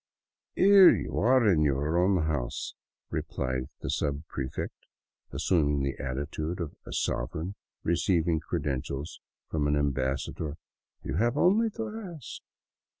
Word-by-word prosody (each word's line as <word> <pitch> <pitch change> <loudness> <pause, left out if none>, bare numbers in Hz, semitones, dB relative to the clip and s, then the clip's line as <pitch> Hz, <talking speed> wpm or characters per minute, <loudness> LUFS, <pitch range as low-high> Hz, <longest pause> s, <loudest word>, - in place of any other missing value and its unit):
" - - -65
Here 195 -1 +8
you - - 0
are 125 +1 +4
in 85 -6 +4
your 75 +2 +1
own 90 -2 +3
house," 75 -6 -2 0.4
replied 65 -1 -2
the - - -4
subprefect, 70 -2 -3 0.4
assum 80 -6 +2
ing 70 -1 +1
the 70 0 -1
attitude 75 +6 -3
of 85 -4 -4
a - - -7
sovereign 80 +10 -2 0.3
receiving 85 -1 +2
credentials 75 -2 -3 0.3
from 75 -2 0
an 75 - +2
ambassa 70 -2 0
dor; 75 -1 -5 0.2
" - - -46
You - - -2
have 120 +6 +2
only 210 +8 +4
to 225 -1 -2 0.3
ask." 145 - -9
80 Hz, 140 wpm, -29 LUFS, 70-95 Hz, 0.4 s, Here